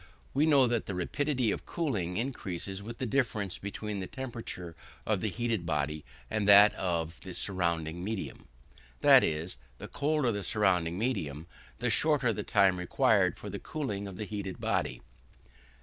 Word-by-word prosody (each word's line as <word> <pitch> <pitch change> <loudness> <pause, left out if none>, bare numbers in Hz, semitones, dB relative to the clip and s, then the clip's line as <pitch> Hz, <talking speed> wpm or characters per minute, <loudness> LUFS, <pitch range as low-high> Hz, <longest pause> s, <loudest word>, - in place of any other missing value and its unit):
We 145 +4 +3
know 140 -4 +6
that 120 -2 0
the 95 - -3
rapidity 130 - 0
of - - -5
cooling 105 - -2
increases 100 -6 -4
with 115 +3 -7
the 130 - -2
difference 110 -6 -1
between 100 +1 -4
the 95 - -4
temperature 115 -10 -6 0.3
of 105 -4 0
the 110 - 0
heated 115 -3 -1
body 75 -2 -1 0.2
and 110 -2 -1
that 100 +1 +9
of 85 -3 -2
the 95 -3 -7
surrounding 85 -3 -1
medium; 105 0 -5 0.5
that - - +8
is, 80 0 -2 0.2
the - - -8
colder 145 -3 +1
the 100 -2 -2
surrounding 90 -5 +1
medium 80 - -2 0.3
the - - 0
shorter 145 -7 +3
the 105 - -3
time 100 -3 +3
required 90 -1 +2
for - - -7
the - - -5
cooling 105 -10 -4
of 95 - -8
the 105 - -4
heated 100 -3 -5
body. 65 -2 -1
100 Hz, 165 wpm, -30 LUFS, 90-120 Hz, 0.5 s, that